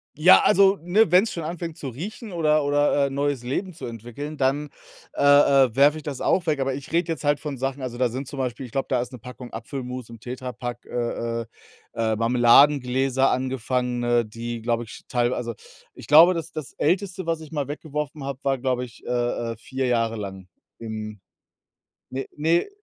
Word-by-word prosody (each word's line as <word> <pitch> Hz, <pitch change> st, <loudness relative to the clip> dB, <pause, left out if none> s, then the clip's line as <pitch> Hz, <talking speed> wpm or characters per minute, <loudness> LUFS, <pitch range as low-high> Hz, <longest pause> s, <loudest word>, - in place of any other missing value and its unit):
Ja, 165 Hz, +5 st, +7 dB
also, 195 Hz, -1 st, +5 dB
ne, 180 Hz, +3 st, +3 dB
wenn's 190 Hz, +5 st, +5 dB
schon 170 Hz, -, -5 dB
anfängt 165 Hz, 0 st, -5 dB
zu 140 Hz, -, -6 dB
riechen 200 Hz, -, -7 dB
oder 155 Hz, -3 st, +2 dB
oder, 145 Hz, 0 st, +2 dB
äh, -, -, -1 dB
neues 140 Hz, -2 st, -1 dB
Leben 180 Hz, +10 st, -3 dB
zu 165 Hz, -, -8 dB
entwickeln, 120 Hz, +6 st, -7 dB
dann, 140 Hz, +2 st, 0 dB, 0.4 s
äh, -, -, -4 dB
äh, 140 Hz, -4 st, +5 dB
werfe 145 Hz, +3 st, +5 dB
ich 155 Hz, -, -9 dB
das 140 Hz, -3 st, -5 dB
auch 180 Hz, -, +1 dB
weg. 150 Hz, -3 st, +1 dB
Aber 135 Hz, 0 st, 0 dB
ich 135 Hz, +1 st, -8 dB
rede 170 Hz, +1 st, +1 dB
jetzt 155 Hz, -2 st, -4 dB
halt 145 Hz, 0 st, +2 dB
von 145 Hz, -3 st, -5 dB
Sachen 135 Hz, +2 st, -3 dB
also 120 Hz, -2 st, -5 dB
da 125 Hz, -2 st, +2 dB
sind 130 Hz, +3 st, -5 dB
zum 140 Hz, -, -7 dB
Beispiel 130 Hz, +1 st, -3 dB
ich 120 Hz, -, -12 dB
glaube, 135 Hz, +2 st, -2 dB
da 125 Hz, -2 st, +1 dB
ist 125 Hz, -, -6 dB
'ne 125 Hz, -, -8 dB
Packung 125 Hz, +1 st, -10 dB
Apfelmus 125 Hz, +1 st, -6 dB
im 115 Hz, -2 st, -11 dB
Tetrapack, 125 Hz, 0 st, -6 dB
äh, 115 Hz, -1 st, -2 dB
äh, -, -, -7 dB, 0.5 s
äh, 110 Hz, -1 st, 0 dB
Marmeladengläser 125 Hz, +3 st, +4 dB
angefangene, 125 Hz, -1 st, 0 dB
die, 115 Hz, +1 st, -6 dB
glaube 120 Hz, 0 st, 0 dB
ich, 115 Hz, -, -11 dB
teil 120 Hz, -1 st, +1 dB
also, 120 Hz, -1 st, -3 dB, 0.4 s
ich -, -, -12 dB
glaube, 165 Hz, +5 st, +8 dB
das 165 Hz, -1 st, -5 dB
das 155 Hz, -3 st, -7 dB
Älteste, 185 Hz, +2 st, -1 dB
was 165 Hz, -1 st, 0 dB
ich 155 Hz, -, -11 dB
mal 145 Hz, -4 st, -2 dB
weggeworfen 150 Hz, 0 st, -5 dB
habe, 135 Hz, -1 st, -5 dB
war, 135 Hz, -1 st, +1 dB
glaube 125 Hz, -1 st, -1 dB
ich, 120 Hz, -1 st, -16 dB
äh, -, -, -6 dB, 0.4 s
äh, 115 Hz, -, -7 dB
4 130 Hz, +3 st, -4 dB
Jahre 115 Hz, -2 st, +1 dB
lang 95 Hz, -3 st, -7 dB, 0.3 s
im 110 Hz, -2 st, -6 dB, 0.9 s
ne, 135 Hz, +1 st, -4 dB
ne, 165 Hz, -, +2 dB
135 Hz, 195 wpm, -24 LUFS, 120-150 Hz, 0.9 s, glaube